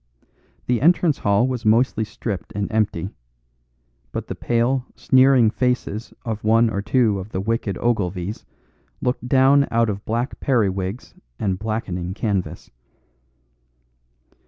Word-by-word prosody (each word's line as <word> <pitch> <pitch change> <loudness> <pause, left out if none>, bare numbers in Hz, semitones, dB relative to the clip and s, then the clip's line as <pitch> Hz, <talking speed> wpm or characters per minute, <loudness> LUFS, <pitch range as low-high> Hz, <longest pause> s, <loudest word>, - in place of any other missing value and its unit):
The 120 -1 0
entrance 165 -1 +3
hall 100 +4 +2
was 125 -2 -3
mostly 110 +1 +3
stripped 105 -4 -6
and 100 +1 -2
empty; 105 -4 -1 1.0
but - - -4
the - - -2
pale, 120 +2 0
sneering 130 -4 +4
faces 125 -3 -2
of 110 -2 -4
one 115 +1 +4
or 100 - -2
two 105 -1 +2
of 95 +3 -8
the 95 - -3
wicked 105 -1 -2
Ogilvies 100 -4 -2 0.6
looked 125 0 -2
down 135 +2 +5
out 115 -1 +2
of 100 +1 -6
black 120 +4 -2
periwigs 100 -4 -1 0.2
and 95 -3 -1
blackening 95 -5 -3
canvas. 100 -5 -3
110 Hz, 125 wpm, -22 LUFS, 100-125 Hz, 1.0 s, down